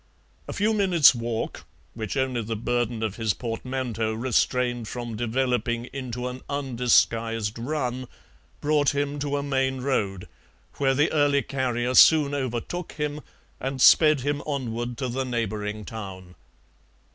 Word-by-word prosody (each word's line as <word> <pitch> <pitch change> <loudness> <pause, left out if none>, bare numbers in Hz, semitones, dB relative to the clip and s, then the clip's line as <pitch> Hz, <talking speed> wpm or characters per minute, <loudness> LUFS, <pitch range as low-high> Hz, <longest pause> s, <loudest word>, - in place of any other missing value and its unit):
A - - -5
few 215 +2 +1
minutes' 185 -9 +6
walk, 115 -1 -4 0.3
which 110 +3 -4
only 130 -2 0
the 115 +1 -3
burden 120 0 -1
of 105 -3 -3
his 110 -3 0
portmanteaux 115 -2 -3
restrained 120 0 0
from 120 -1 -5
developing 120 0 -1
into 125 -2 -4
an 125 +1 -6
undisguised 115 -5 +1
run, 130 -1 -3 0.5
brought 145 -1 +2
him 145 0 -1
to 145 0 -1
a 140 - -2
main 130 -2 0
road, 100 -9 -1 0.5
where 135 -1 +2
the 145 +3 +2
early 145 -2 +3
carrier 125 -2 -1
soon 145 +1 +6
overtook 135 +6 -3
him 150 0 -3 0.4
and 135 0 -3
sped 150 +1 +6
him 145 +2 -1
onward 120 -4 -3
to 130 - -2
the 130 +2 -2
neighbouring 110 -4 -3
town. 95 -5 -8
125 Hz, 135 wpm, -25 LUFS, 115-140 Hz, 0.5 s, minutes